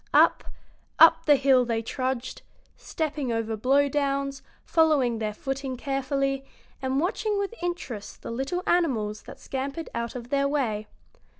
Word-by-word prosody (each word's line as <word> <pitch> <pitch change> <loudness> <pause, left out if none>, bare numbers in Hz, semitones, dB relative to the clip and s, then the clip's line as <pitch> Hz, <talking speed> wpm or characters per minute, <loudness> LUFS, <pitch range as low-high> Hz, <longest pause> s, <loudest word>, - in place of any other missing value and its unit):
Up, - - +5 0.5
up 325 0 +7
the 295 - +8
hill 265 -2 +4
they 230 -2 -1
trudged, 255 +1 -3 0.3
stepping 300 -5 -3
over 225 -1 -1
blow 270 +6 +3
downs, 275 -1 -1 0.2
following 285 -8 +3
their 215 -1 -1
footing 270 +3 -4
carefully, 275 0 -1 0.4
and 265 +1 0
watching 410 +5 0
with 400 +2 -2
interest 275 -13 -5
the - - -5
little 270 +10 -2
animals 225 -12 +1
that - - -12
scampered 275 +4 -4
out 235 +1 -3
of 240 -1 -7
their 280 0 +2
way. 230 -8 -1
270 Hz, 140 wpm, -26 LUFS, 240-295 Hz, 0.5 s, the